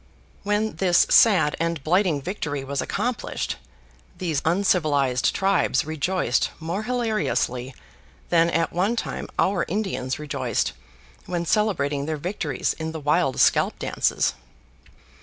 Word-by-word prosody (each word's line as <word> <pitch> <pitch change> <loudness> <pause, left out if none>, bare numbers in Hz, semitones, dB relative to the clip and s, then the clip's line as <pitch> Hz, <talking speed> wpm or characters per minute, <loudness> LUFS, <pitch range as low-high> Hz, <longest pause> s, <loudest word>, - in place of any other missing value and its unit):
When 210 +2 -1
this 180 -2 +4
sad 180 -10 +5
and 165 -3 -1
blighting 170 -3 +2
victory 145 -7 -3
was 140 0 -2
accomplished, - - -3 0.6
these 165 -6 -1
uncivilized 155 -8 +2
tribes 195 -9 +2
rejoiced 155 -3 0
more 170 +5 -3
hilariously 215 - -1 0.5
than 170 -1 +4
at 165 0 0
one 195 +7 +1
time - - -4
our 200 - +2
Indians 185 -10 -2
rejoiced 130 - -2 0.5
when 175 -1 -2
celebrating 150 -8 0
their 155 -1 -2
victories 155 -4 -2
in 160 0 -4
the 160 - -5
wild 150 -2 +1
scalp - - +3
dances. - - 0
165 Hz, 120 wpm, -24 LUFS, 140-190 Hz, 0.6 s, sad